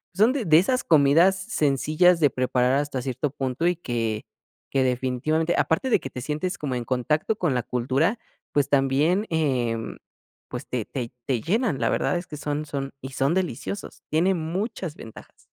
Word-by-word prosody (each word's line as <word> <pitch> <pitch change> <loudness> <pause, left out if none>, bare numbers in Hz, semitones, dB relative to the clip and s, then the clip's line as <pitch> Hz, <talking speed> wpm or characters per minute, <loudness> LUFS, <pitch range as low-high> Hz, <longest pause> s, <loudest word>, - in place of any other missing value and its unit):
son 220 +6 +4
de 255 -7 -2
de 155 -1 +6
esas 255 +7 +1
comidas 160 +5 +5
sencillas 165 - +2
de 145 -4 +4
preparar, 125 0 +1
hasta 140 -2 -1
cierto 130 +2 -2
punto, 135 +4 -1
y 180 - +2
que 115 -8 -3 0.5
que 135 - +2
definitivamente, 130 +6 0
aparte 210 +11 +1
de - - +5
que 135 - -7
te 125 - -6
sientes 155 +7 -3
como 140 -4 -3
en 120 - -2
contacto 150 - 0
con 160 -7 0
la 125 - +1
cultura, 135 - 0 0.4
pues, 145 -1 +2
también, 145 +9 +2
em, 125 -8 -1 0.5
pues, - - -6
te - - -2
te 120 -3 -5 0.2
te 125 -4 0
llenan, 200 - 0
la 115 - +1
verdad 175 - +1
es 175 - -5
que 150 - -7
son 150 +1 -3
son 135 -2 -4
y 130 - -6
son 135 +5 +1
deliciosos, 190 +2 -4
tienen 175 +4 +2
muchas 180 0 -3
ventajas. 110 - -13
150 Hz, 175 wpm, -25 LUFS, 130-175 Hz, 0.5 s, de